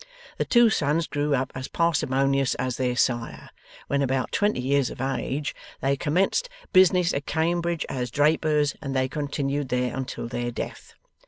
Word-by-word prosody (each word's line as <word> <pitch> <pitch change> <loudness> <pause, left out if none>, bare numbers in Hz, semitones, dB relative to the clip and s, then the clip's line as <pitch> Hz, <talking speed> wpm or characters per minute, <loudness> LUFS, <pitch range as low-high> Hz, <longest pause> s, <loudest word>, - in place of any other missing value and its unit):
The - - +1
two 240 -2 +5
sons 150 -1 +1
grew 145 -1 0
up 130 0 -2
as 130 0 -5
parsimonious 135 -5 +1
as 125 -1 -2
their 125 -1 0
sire. 120 -2 -1 0.3
When 140 0 0
about 130 -2 0
twenty 205 -9 +1
years 135 0 +1
of - - -9
age, 135 +2 -2 0.3
they 135 +1 +1
commenced 190 - +1 0.2
business 185 -2 +5
at 140 - -3
Cambridge 170 0 0
as 125 -2 -3
drapers, 150 +2 +2
and 135 -2 -4
they 130 0 +2
continued 140 -1 -2
there 125 -1 0
until 130 -3 -4
their 120 0 -3
death. 120 - -7
140 Hz, 160 wpm, -25 LUFS, 130-155 Hz, 0.3 s, two